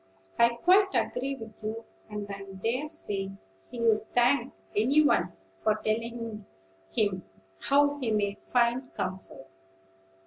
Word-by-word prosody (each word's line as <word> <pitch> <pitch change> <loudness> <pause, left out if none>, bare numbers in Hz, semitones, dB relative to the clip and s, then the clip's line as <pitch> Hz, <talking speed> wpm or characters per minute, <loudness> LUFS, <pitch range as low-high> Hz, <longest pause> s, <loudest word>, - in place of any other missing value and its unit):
"I 235 0 +7
quite 380 +8 +4
agree 270 +2 0
with 225 -4 -11
you; 220 +2 -4 0.2
and 210 -1 -4
I 200 -1 -6 0.2
dare 255 +6 0
say 205 -11 -2 0.4
he'd 225 -3 +1
thank 245 +3 +3 0.2
any 270 +9 +4
one - - +3 0.3
for 215 - +2
telling 225 0 -3 0.5
him 190 - 0 0.4
how 285 +1 +3
he 250 -4 -1
may 205 -2 +1
find 245 +1 +1
comfort. 185 -7 -5
230 Hz, 125 wpm, -29 LUFS, 210-260 Hz, 0.5 s, I